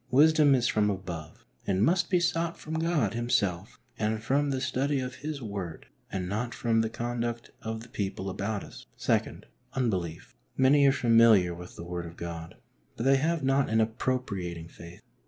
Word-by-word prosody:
Wisdom 150 +1 +6
is 120 -2 +2
from 105 -1 +2
above, 90 -6 -6 0.2
and 95 +2 +3
must 175 +1 +2
be 180 - +3
sought 170 -1 0
from 155 - -7
God 160 - +1
Himself 105 -5 -1 0.2
and 110 0 -1
from 140 +5 +1
the 135 -1 0
study 135 +2 0
of 125 0 -5
His 150 -3 -5
Word, 100 -6 -5 0.3
and 90 -1 -2
not 110 +5 -2
from 115 -2 +2
the 110 - -1
conduct 120 0 -3
of 110 0 -4
the - - -12
people 100 -4 -4
about 100 +2 -3
us. - - -12 0.2
II. - - +1 0.3
U^ibelief, 95 -11 -2 0.2
Many 140 +2 +5
are - - +6
familiar 115 -8 +5
with 90 +1 -10
the 85 - -8
Word 85 0 -4
of 85 - -12
God, 85 -1 -6 0.4
but - - -3
they 135 +1 +5
have 160 +2 0
not 135 0 +2
an 110 0 +2
appropriating 110 -8 -2
faith. 85 +3 -12
115 Hz, 175 wpm, -28 LUFS, 95-135 Hz, 0.4 s, Wisdom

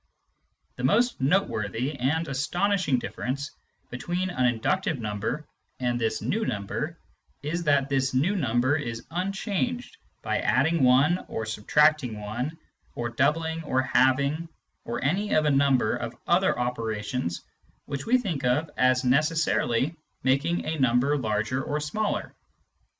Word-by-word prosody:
The 125 - -6
most 235 - +2
noteworthy 130 - 0
and 160 +6 0
astonishing 170 +3 +1
difference 135 +3 -4 0.4
between 175 +9 -2
an 130 -7 +2
inductive 150 +8 0
number 110 +7 -3 0.3
and 120 -1 -1
this 115 - -1
new 220 +3 0
number 150 - -3 0.5
is 170 +4 -2
that 140 -2 +3
this 135 -1 +1
new 150 +11 +1
number 130 - +2
is 115 -7 -4
unchanged 195 +7 -2 0.3
by - - 0
adding 155 +5 +2
1 135 +8 +4
or 110 - -4
subtracting 125 +3 +2
1 120 +10 -4 0.4
or 120 0 -2
doubling 160 +6 0
or 130 -3 +1
halving 140 +6 +2 0.4
or 120 - -3
any 195 +9 +1
of 155 - +3
a 150 - +3
number 135 -5 +3
of 120 0 -5
other 185 +2 +3
operations 115 -5 -2 0.4
which 140 -1 -5
we 250 +2 +5
think 180 - -3
of 145 +5 +1
as 130 0 +3
necessarily 150 0 +2 0.3
making 140 +7 +1
a 160 -1 -2
number 130 +3 +3
larger 110 +1 -1
or 150 +2 -2
smaller. 200 +8 -2
140 Hz, 135 wpm, -26 LUFS, 125-165 Hz, 0.5 s, we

